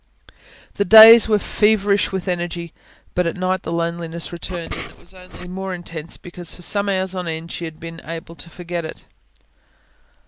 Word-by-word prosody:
The 200 Hz, -, +2 dB
days 225 Hz, +3 st, +10 dB
were 215 Hz, -, +4 dB
feverish 205 Hz, -1 st, +1 dB
with 190 Hz, 0 st, -4 dB
energy. 175 Hz, -1 st, -3 dB, 0.4 s
But 180 Hz, -1 st, 0 dB
at 170 Hz, -, -3 dB
night 185 Hz, 0 st, -1 dB
the 165 Hz, -, -6 dB
loneliness 170 Hz, 0 st, -3 dB
returned, 170 Hz, 0 st, -6 dB
and -, -, -7 dB
was 175 Hz, -, -13 dB
only 185 Hz, -1 st, -14 dB
the 180 Hz, -, -10 dB
more 190 Hz, +1 st, -5 dB
intense 170 Hz, -2 st, -8 dB
because, 175 Hz, -1 st, -8 dB
for 175 Hz, -, -11 dB
some 200 Hz, +3 st, +1 dB
hours 190 Hz, -1 st, -1 dB
on 180 Hz, -2 st, -4 dB
end, 165 Hz, +1 st, -5 dB
she 170 Hz, -, -5 dB
had 160 Hz, -1 st, -9 dB
been 165 Hz, 0 st, -9 dB
able 165 Hz, +1 st, -8 dB
to 170 Hz, -, -11 dB
forget 175 Hz, 0 st, -5 dB
it. 160 Hz, -, -9 dB
175 Hz, 180 wpm, -20 LUFS, 170-190 Hz, 0.4 s, days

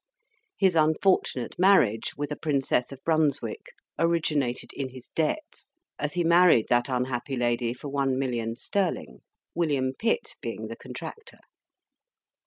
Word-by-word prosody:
His 190 Hz, -3 st, +3 dB
unfortunate 155 Hz, -4 st, +2 dB
marriage 180 Hz, -, +4 dB
with 145 Hz, 0 st, -3 dB
a -, -, -1 dB
Princess 140 Hz, -5 st, 0 dB
of 135 Hz, -1 st, -11 dB
Brunswick 145 Hz, -8 st, 0 dB, 0.3 s
originated 155 Hz, -7 st, 0 dB
in 135 Hz, -2 st, -4 dB
his 130 Hz, -1 st, -13 dB
debts; 305 Hz, -, -3 dB, 0.2 s
as 150 Hz, 0 st, -2 dB
he 175 Hz, -1 st, +1 dB
married 170 Hz, -8 st, +5 dB
that 120 Hz, +1 st, +2 dB
unhappy 125 Hz, +1 st, -2 dB
lady 120 Hz, -1 st, 0 dB
for 135 Hz, -, -8 dB
one 135 Hz, -2 st, 0 dB
million 120 Hz, -4 st, -2 dB
sterling, 180 Hz, -, -2 dB, 0.3 s
William 140 Hz, -6 st, 0 dB
Pitt 230 Hz, -, -1 dB
being -, -, -5 dB
the -, -, -6 dB
contractor! 450 Hz, -, -9 dB
140 Hz, 130 wpm, -27 LUFS, 125-165 Hz, 0.3 s, married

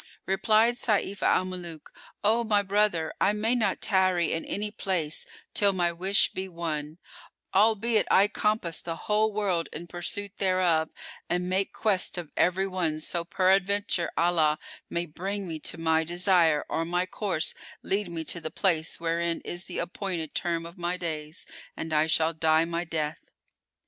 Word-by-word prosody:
Replied 215 Hz, +5 st, +3 dB
Sayf 205 Hz, -4 st, 0 dB
al 185 Hz, -, +3 dB
Muluk, 175 Hz, -4 st, -7 dB, 0.3 s
"O 225 Hz, +3 st, +3 dB
my 210 Hz, -2 st, +2 dB
brother 200 Hz, -5 st, +1 dB
I 205 Hz, -, +4 dB
may 220 Hz, +3 st, 0 dB
not 235 Hz, -4 st, 0 dB
tarry 185 Hz, -3 st, +2 dB
in 165 Hz, -, -2 dB
any 210 Hz, +1 st, -3 dB
place 175 Hz, -7 st, -2 dB, 0.3 s
till 200 Hz, -1 st, +3 dB
my 175 Hz, -2 st, +1 dB
wish 190 Hz, +4 st, +2 dB
be 190 Hz, 0 st, -4 dB
won, 160 Hz, -3 st, -4 dB, 0.6 s
albeit 220 Hz, +2 st, +3 dB
I 195 Hz, +2 st, +6 dB
compass 210 Hz, -5 st, 0 dB
the 165 Hz, -1 st, -4 dB
whole 215 Hz, +1 st, +2 dB
world 195 Hz, -5 st, 0 dB
in 170 Hz, -, -6 dB
pursuit 185 Hz, +4 st, -3 dB
thereof 180 Hz, -4 st, +2 dB, 0.4 s
and 180 Hz, +1 st, 0 dB
make 190 Hz, +1 st, 0 dB
quest 195 Hz, -4 st, +1 dB
of 170 Hz, -4 st, -6 dB
every 185 Hz, +2 st, +2 dB
one 170 Hz, -5 st, -1 dB
so 170 Hz, +2 st, -2 dB
peradventure 190 Hz, 0 st, +2 dB
Allah 165 Hz, -3 st, +3 dB, 0.3 s
may 170 Hz, 0 st, -1 dB
bring 190 Hz, +5 st, -4 dB
me 160 Hz, -2 st, -5 dB
to 160 Hz, -, -5 dB
my 160 Hz, 0 st, +2 dB
desire 175 Hz, -2 st, +3 dB
or 165 Hz, -, -1 dB
my 175 Hz, +2 st, 0 dB
course 185 Hz, -4 st, -2 dB, 0.3 s
lead 200 Hz, 0 st, 0 dB
me 165 Hz, -1 st, -4 dB
to 170 Hz, +2 st, -4 dB
the 160 Hz, -, -4 dB
place 165 Hz, -4 st, 0 dB
wherein 170 Hz, 0 st, 0 dB
is 175 Hz, +1 st, -4 dB
the 180 Hz, -, -6 dB
appointed 175 Hz, -3 st, -3 dB
term 170 Hz, -1 st, -1 dB
of 170 Hz, +2 st, -11 dB
my 175 Hz, +1 st, -1 dB
days, 155 Hz, -2 st, -5 dB, 0.3 s
and 160 Hz, -1 st, -4 dB
I 155 Hz, +1 st, +3 dB
shall 160 Hz, +1 st, +2 dB
die 160 Hz, 0 st, +3 dB
my 170 Hz, +1 st, -2 dB
death." 155 Hz, -1 st, -3 dB
175 Hz, 165 wpm, -27 LUFS, 165-200 Hz, 0.6 s, I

